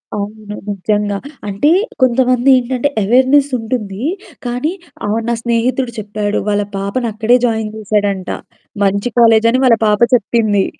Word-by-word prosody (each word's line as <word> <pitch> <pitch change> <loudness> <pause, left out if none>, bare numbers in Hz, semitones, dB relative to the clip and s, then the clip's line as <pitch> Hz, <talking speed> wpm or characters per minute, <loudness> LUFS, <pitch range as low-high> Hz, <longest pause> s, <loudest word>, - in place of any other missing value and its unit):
అవును. 210 0 -6 0.2
నిజంగా 205 +1 -1 0.3
అంటే 205 +10 +1 0.3
కొంతమంది 255 +1 +3
ఏంటంటే 255 +2 -1
అవేర్‌నెస్ 260 +6 +3
ఉంటుంది. 220 -2 -4 0.4
కానీ 250 +7 -1 0.4
ఆహ్, 220 +2 0
నా - - +1
స్నేహితుడు 240 +1 0
చెప్పాడు. 210 0 -2
వాళ్ళ 205 0 +1
పాపని 210 +5 -2
అక్కడే 225 +3 +3
జాయిన్ 220 -2 -1
చేసాడంట. 205 -3 -1 0.5
మంచి 200 +4 +1
కాలేజని 230 +2 +4
వాళ్ళ 230 -3 +5
పాప 210 0 +2 0.2
చెప్పింది. 215 -3 +1
220 Hz, 120 wpm, -16 LUFS, 205-245 Hz, 0.5 s, వాళ్ళ